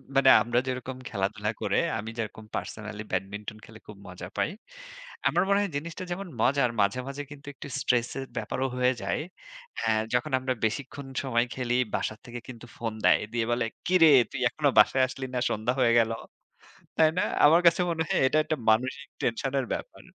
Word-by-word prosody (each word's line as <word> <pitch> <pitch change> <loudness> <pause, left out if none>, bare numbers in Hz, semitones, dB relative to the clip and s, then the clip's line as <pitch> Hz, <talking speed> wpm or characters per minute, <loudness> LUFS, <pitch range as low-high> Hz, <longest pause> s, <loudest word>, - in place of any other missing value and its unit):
মানে 135 -1 +6
আমরা 120 +1 +1
যেরকম 130 0 -4
খেলাধুলা 105 +1 -2
করে 100 -2 +1 0.2
আমি 110 +1 -5
যেরকম 110 0 -5
personally 105 -1 -5
Badminton 105 +3 -4
খেলে 110 0 -14
খুব 105 - -10
মজা 90 -1 -8
পাই। - - +1 0.8
আমার 175 - +2
মনে 200 0 +3
হয় 200 -3 -2
জিনিসটা 165 +4 -6
যেমন 195 +2 -4
মজার; 140 -1 +3
মাঝে, 100 +5 +1
মাঝে 140 +1 -5
কিন্তু 145 0 -12
একটু 140 - -9
stress 125 -3 +1
এর 135 - -4
ব্যাপারও 135 +1 -1
হয়ে 125 0 +3
যায়। - - -1 0.6
হ্যাঁ, 110 -1 +2
যখন 125 +1 0
আমরা 130 0 -1
বেশিক্ষণ 135 +4 -4 0.2
সময় 120 -2 +1
খেলি, 125 -2 -1 0.2
বাসা 110 - -2
থেকে 120 0 -7
কিন্তু 120 -2 -9
ফোন 115 -2 -3
দেয়। - - +6
দিয়ে 115 -2 0
বলে, 120 -1 +1 0.2
"কিরে 175 -2 +6 0.2
তুই - - -4
এখনো 145 +1 +1
বাসায় 130 - +5
আসলি 130 +1 -6
না? - - +1
সন্ধ্যা 110 +4 0
হয়ে 120 -2 +4
গেল।" 115 -1 +2 0.9
তাই 160 -1 +5
না? - - +3 0.2
আমার 165 +3 +6
কাছে 170 +1 +6
মনে 165 -1 0
হয় - - +1
এটা 155 - +2
একটা 155 0 -1
মানসিক 130 +5 0
tension 125 +3 -1
এর 130 - -4
ব্যাপার। - - -8
125 Hz, 185 wpm, -27 LUFS, 110-140 Hz, 0.9 s, মানে